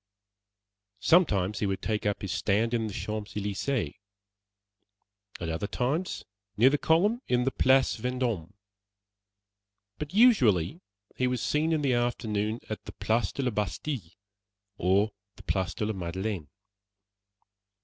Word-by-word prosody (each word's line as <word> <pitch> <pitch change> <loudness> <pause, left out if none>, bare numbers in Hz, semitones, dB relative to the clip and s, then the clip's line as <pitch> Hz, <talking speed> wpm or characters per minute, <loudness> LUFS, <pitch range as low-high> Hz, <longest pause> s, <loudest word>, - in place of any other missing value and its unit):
Sometimes 105 - +3
he 105 - 0
would 95 -1 -3
take 105 -1 -1
up 105 - -1
his 95 - -3
stand 110 +2 +1
in 115 -2 +1
the - - -5
Champs 105 +1 -5
Elysées; 105 +5 -1 1.5
at 85 - -4
other 80 +5 -2
times, 145 - -2 0.3
near 125 +5 +6
the 145 - +1
column 205 +9 +3
in 125 0 +2
the 135 - +1
Place 130 +1 +3
Vendôme; 120 -8 -2 1.5
but 150 0 -5
usually 170 - +4 0.3
he 130 - +1
was 125 -1 -1
seen 155 +7 +1
in 155 -2 +1
the 135 -2 +2
afternoon 110 -2 -1
in 110 - -3
the - - -8
Place 110 -3 0
de 140 - -3
la 125 - +1
Bastille, 105 - -3 0.6
or 100 +4 +2 0.2
the - - -14
Place 95 -1 -1
de 105 - -1
la 110 - -1
Madeleine. 95 -1 -3
110 Hz, 140 wpm, -28 LUFS, 100-135 Hz, 1.5 s, near